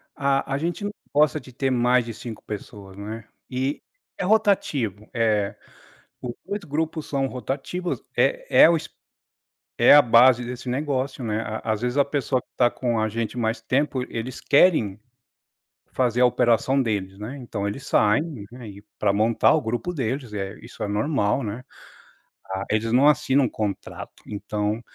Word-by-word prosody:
ah, 140 -1 +1
a - - +1
gente 170 +7 -3
não 205 - -2 0.2
gosta 150 +1 +3
de 130 -1 -14
ter 135 +1 -1
mais 125 0 +3
de 115 - -6
5 110 0 -8
pessoas, 100 -2 -8
não 100 +1 -7
é? 115 -1 -9 0.2
E 130 +2 -2 0.4
é - - -3
rotativo, 185 - +1
eh, 110 -4 +1 0.7
os 120 -1 -4
2 200 +2 -4
grupos 160 0 -3
são 135 -1 0
rotativos, 135 - -4
é - - +2 0.2
é - - +9
o 170 - +4
es - - -8 0.9
é - - +7
a 145 - +9
base 120 0 +5
desse 125 +1 -7
negócio, 135 0 -2
né, 110 -1 -1
a 110 0 -4
às 110 - -5
vezes 125 +2 -1
a 140 - +6
pessoa 140 -3 -1
que - - -38
tá 120 -1 +5
com 120 -2 -1
a 110 - +1
gente 115 +1 -3
mais 115 0 -1
tempo, 130 +2 0
eles 115 +2 -5
querem 140 - +3 0.9
fazer 125 -1 +1
a - - +7
operação 125 +2 +3
deles, 100 -5 -2
né. 110 +6 -6
Então 110 -5 -4
eles 125 +6 -5
saem, 105 +8 +3 0.3
né, 120 -2 -10
e 100 +1 -12 0.2
para 100 -2 +3
montar 110 +2 +3
o 155 - +1
grupo 120 +9 -2
deles, 130 -3 -3
é 100 0 -4
isso 115 - -8
é - - -1
normal, 105 +2 0
né, 110 +4 -5 0.9
ah, 95 +1 -2
eles 110 +2 0
não 135 +4 +6
assinam 135 -3 +3
contrato, 105 -3 -5
então 105 +1 -3
125 Hz, 175 wpm, -24 LUFS, 110-140 Hz, 0.9 s, é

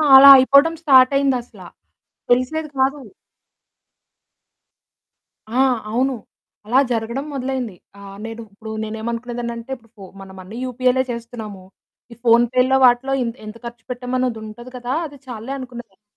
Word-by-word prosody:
అలా 275 +1 +11
అయిపోవడం 280 +5 +5
స్టార్ట్ 265 -3 +6
అయిందసలా 260 -3 -2 0.6
తెలిసేది 255 +6 +1
కాదు. 270 +2 +1 2.6
ఆ! - - +2 0.3
అవును. 260 +4 +1 0.5
అలా 245 +5 +3
జరగడం 235 +4 -2
మొదలైంది, 260 -5 -3 0.2
ఆహ్, 195 0 -11
నేను 225 0 -7
ఇప్పుడు 220 +2 -9
నేనేం 220 +1 -5
అనుకునేదానంటే 235 0 -5
ఇప్పుడు 230 -2 -21
ఫో 195 - -10 0.2
మనం 190 0 -12
అన్నీ 205 +5 -10
యూపీఐలే 255 +1 +1
చేస్తున్నాము. 230 -4 -8 0.5
ఈ - - -15
ఫోన్‌పే‌లో 250 +3 +4
వాటిలో 250 +2 +3
ఎత్ 230 +1 -5
ఎంత 215 +2 -9
ఖర్చు 235 -1 -9
పెట్టాము 250 0 -3 0.3
ఉంటది 240 +4 -11
కదా! 245 0 -5
అది 285 -2 -10
చాలులే 240 +2 -6
అనుకునేదాన్ని. 240 -6 -10
245 Hz, 125 wpm, -20 LUFS, 230-260 Hz, 2.6 s, అలా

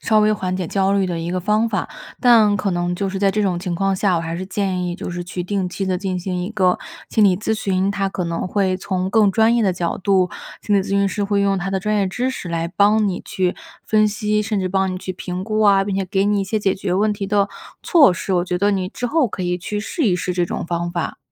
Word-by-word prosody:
稍 215 -1 +3
微 215 0 +4
缓 185 -3 -2
解 185 -2 -3
焦 195 +2 +1
虑 200 -1 +2
的 175 -2 -2
一 170 - -3
个 185 - -1
方 210 +5 +1
法， - - -2 0.3
但 225 -5 +5
可 195 0 -1
能 175 0 -1
就 195 +3 -2
是 195 - -4
在 195 0 +3
这 210 +2 0
种 185 -3 0
情 180 -2 -3
况 195 +2 +1
下， 190 -1 +1
我 165 - 0
还 165 0 -4
是 185 +2 -5
建 190 -2 -1
议 175 - -3
就 - - -5
是 175 0 -4
去 180 +1 -5
定 190 0 -2
期 195 +2 -4
地 185 -1 -1
进 185 -2 -2
行 180 0 -3
一 180 - -3
个 185 -5 +1 0.3
心 220 - +2
理 190 -3 +5
咨 210 +2 -2
询， 195 -3 0
它 195 -1 -1
可 185 -2 -3
能 170 +2 -3
会 190 -2 +1
从 185 -1 -2
更 215 -2 +4
专 225 +3 +3
业 235 - +2
的 190 -3 +1
角 170 -1 -2
度- 190 -1 +2 0.3
心 205 - +1
理 200 - +4
咨 - - -8
询 200 0 +2
师 205 +1 -2
会 200 0 +1
用 195 -1 +1
他 195 +2 -3
的 195 - 0
专 210 +3 -1
业 200 - +2
知 245 +7 -1
识 195 -9 -6
来 165 0 -1
帮 205 +4 +3
你 190 -3 -2
去 185 -1 -1 0.3
分 215 -1 +3
析， 210 0 0
甚 210 -1 -1
至 185 - -1
帮 190 +1 0
你 185 - -4
去 185 0 -5
评 180 +1 -5
估 215 0 -1
啊， 200 -2 +5
并 200 - -2
且 195 -1 -1
给 195 +1 +1
你 205 0 +2
一 - - -1
些 215 +3 -1
解 195 -2 +1
决 190 -1 -2
问 210 +2 +2
题 200 -1 -4
的 200 0 +1 0.3
措 305 - +6
施。 170 +4 -3
我 175 -1 +2
觉 180 -1 -2
得 200 +3 +2
你 190 -2 -1
之 245 +5 -4
后 290 0 +2
可 190 - -5
以 180 0 -1
去 210 +4 -4
试 265 - -3
一 190 -6 +3
试 180 +1 -2
这 175 -1 0
种 - - -4
方 170 0 -2
法。 170 -1 -3
195 Hz, 305 characters per minute, -20 LUFS, 180-205 Hz, 0.3 s, 措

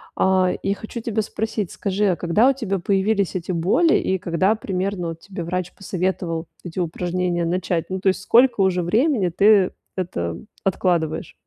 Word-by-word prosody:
А, 185 -1 +3
и 200 - +1
хочу 220 +3 -7
тебя 220 -1 -1
спросить, 215 -2 -3
скажи, 200 +1 -1
а 180 - +2
когда 205 +11 +3
у - - +3
тебя 200 -7 -2
появились 195 +1 +1
эти 185 +1 -3
боли 195 - +3
и 190 -1 0
когда 180 +5 +1
примерно 190 -3 -3
вот 165 0 -7
тебе 190 -3 -7
врач 180 +1 -3
посоветовал 180 -3 -3 0.2
эти 175 +1 -6
упражнения 175 0 -1
начать? 175 -1 -1
Ну, 190 0 -3
то 190 - +2
есть, 190 - -1
сколько 240 +1 +4
уже 185 -2 +2
времени 215 - +2
ты 200 +2 +4 0.2
это 85 - -3 0.3
откладываешь? 170 -4 0
185 Hz, 165 wpm, -22 LUFS, 175-200 Hz, 0.3 s, сколько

